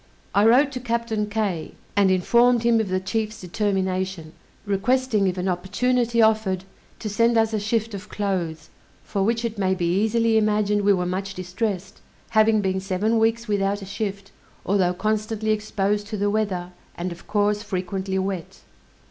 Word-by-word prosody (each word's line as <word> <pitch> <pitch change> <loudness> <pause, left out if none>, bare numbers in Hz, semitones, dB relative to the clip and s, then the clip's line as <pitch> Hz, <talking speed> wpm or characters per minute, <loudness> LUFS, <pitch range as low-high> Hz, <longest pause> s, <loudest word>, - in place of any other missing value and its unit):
I 205 +2 +5
wrote 270 +5 +5
to 255 - -4
Captain 230 -3 -2
Kay, 200 -6 -2 0.2
and 200 -1 +4
informed 235 +6 +3
him 235 -1 +4
of 215 -3 -1
the 185 0 +1
chief's 215 +3 -3
determination, 190 -3 -2 0.3
requesting 215 +1 +1
if 185 0 -1
an 180 +1 -2
opportunity 230 +6 +1
offered, 215 -4 +2 0.3
to 220 - -6
send 230 +3 +2
us 225 0 +2
a 215 - +1
shift 220 +1 -1
of 200 -1 -7
clothes, 180 -6 -3 0.3
for 200 - -2
which 230 +3 +1
it 225 -2 -4
may 190 -1 +2
be 175 -2 -1
easily 220 +5 +2
imagined 210 -1 +1
we 205 0 +4
were 180 -2 0
much 190 +2 -3
distressed, 185 +1 -4 0.3
having 220 -1 +4
been 190 -1 0
seven 200 +4 0
weeks 225 +1 +1
without 200 -1 0
a - - -6
shift; 200 0 -5 0.3
although 185 -2 +2
constantly 215 +2 -1
exposed 210 -1 -1
to 215 0 -4
the 205 +1 +1
weather, 190 -5 -1 0.2
and 175 +1 -4
of 170 +2 -11
course 210 0 +1
frequently 190 -1 -3
wet. 190 -3 -4
205 Hz, 165 wpm, -23 LUFS, 190-220 Hz, 0.3 s, I